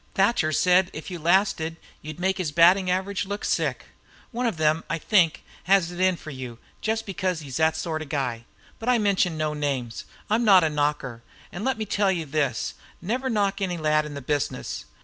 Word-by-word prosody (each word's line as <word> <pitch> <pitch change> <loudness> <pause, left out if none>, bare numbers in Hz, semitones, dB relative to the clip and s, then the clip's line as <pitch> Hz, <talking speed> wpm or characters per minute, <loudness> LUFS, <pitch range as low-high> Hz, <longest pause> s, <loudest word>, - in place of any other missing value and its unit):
Thatcher 195 -5 +2
said 180 +3 +3
if 155 +5 -7
you 175 - -5
lasted 165 -1 +2 0.3
you 155 - -6
'd 155 - -12
make 190 +1 0
his 165 -5 -1
batting 180 +4 +5
average 190 +2 -1
look 205 +1 -4
sick. - - -1 0.5
One 245 0 -1
of 215 -8 -2
them, 155 +1 +2
I 165 - 0
think, 170 -2 +2 0.2
has 185 -2 +3
it 175 - -8
in 185 0 +3
for 155 - -9
you 130 -4 -7 0.2
just 220 +1 -1
because 185 -3 -2
he's 135 -4 -6
that 160 0 +3
sort 160 0 -3
of 155 - -6
a - - -19
guy. 125 -5 -2 0.3
But 225 - -2
I 250 - +5
mention 195 -6 +1
no 155 -1 -1
names. 135 -6 -3 0.2
I'm 220 +3 +1
not 195 -5 +7
a 160 - +1
knocker, 145 -5 -1 0.3
and 175 - -6
let 265 0 0
me 220 - -3
tell 200 -1 +1
you 170 -4 -2
this 140 -5 -1 0.3
never 250 +9 -2
knock 200 -3 0
any 180 -3 -1
lad 155 -1 +1
in 145 - -8
the 140 - -6
business. 145 - -2
170 Hz, 210 wpm, -25 LUFS, 150-195 Hz, 0.5 s, not